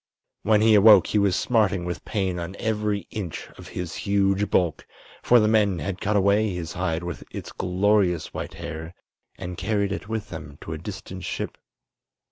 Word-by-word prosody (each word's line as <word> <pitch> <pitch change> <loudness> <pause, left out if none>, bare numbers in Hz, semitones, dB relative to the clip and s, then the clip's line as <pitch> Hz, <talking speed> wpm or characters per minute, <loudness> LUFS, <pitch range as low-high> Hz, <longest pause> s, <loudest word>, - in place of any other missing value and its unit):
When 105 +1 +3
he 110 0 +5
awoke 105 +1 +8
he 105 - +1
was 100 -3 +3
smarting 105 -7 +1
with 90 0 -4
pain 95 -4 -1
on 85 +3 -5
every 105 -3 -1
inch 95 -7 -5
of - - -12
his 90 -2 -5
huge 100 0 +1
bulk, 85 -4 +1 0.4
for 120 - +5
the 105 - +3
men 105 -4 +3
had 90 +5 -4
cut 105 +1 0
away 100 0 +3
his 85 -2 -5
hide 85 -2 -2
with 90 - -5
its - - -7
glorious 90 -2 +1
white - - -5
hair 80 +3 -7 0.4
and 90 -2 -6
carried 100 -2 0
it 100 +1 -5
with 110 -1 -3
them 80 -3 -8
to 80 - -6
a 80 - -5
distant 95 0 -7
ship. - - -4
95 Hz, 180 wpm, -25 LUFS, 90-105 Hz, 0.4 s, awoke